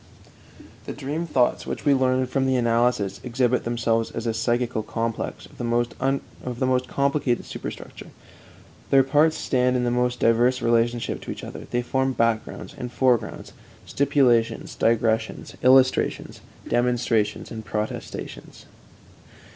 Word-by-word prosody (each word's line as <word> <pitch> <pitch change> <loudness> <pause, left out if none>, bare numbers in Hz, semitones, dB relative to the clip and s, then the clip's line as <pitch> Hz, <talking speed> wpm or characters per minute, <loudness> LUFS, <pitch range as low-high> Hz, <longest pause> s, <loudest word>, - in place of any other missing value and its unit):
The - - -4
dream 150 +5 -4
thoughts 125 -5 +1
which - - -5
we 145 - +5
learn 130 -1 +2
from 135 +1 0
the 130 - +2
analysis 115 -5 +1
exhibit 125 0 0
themselves 115 -1 0
as 115 - -6
a 115 - 0
psychical 120 +1 0
complex 115 +1 -4
of - - -18
the - - -3 1.0
most 130 0 +1
complicated 140 -3 0
superstructure. - - -8 0.8
Their 135 -1 +6
parts 150 +4 +3
stand 125 -1 +1
in 125 - +1
the 120 - +1
most 125 0 0
diverse 120 +3 +3
relationship 120 0 0
to - - -6
each - - -8
other; - - -8
they 120 0 -1
form 130 +1 0
backgrounds 115 -2 -1
and 125 -1 -6
foregrounds, 120 -4 0 0.3
stipulations, 130 -5 +1
digressions, 115 -1 0
illustrations, 130 0 +3 0.3
demonstrations, 120 -3 0
and 110 -1 -6
protestations. 105 0 -6
125 Hz, 130 wpm, -24 LUFS, 115-130 Hz, 1.0 s, Their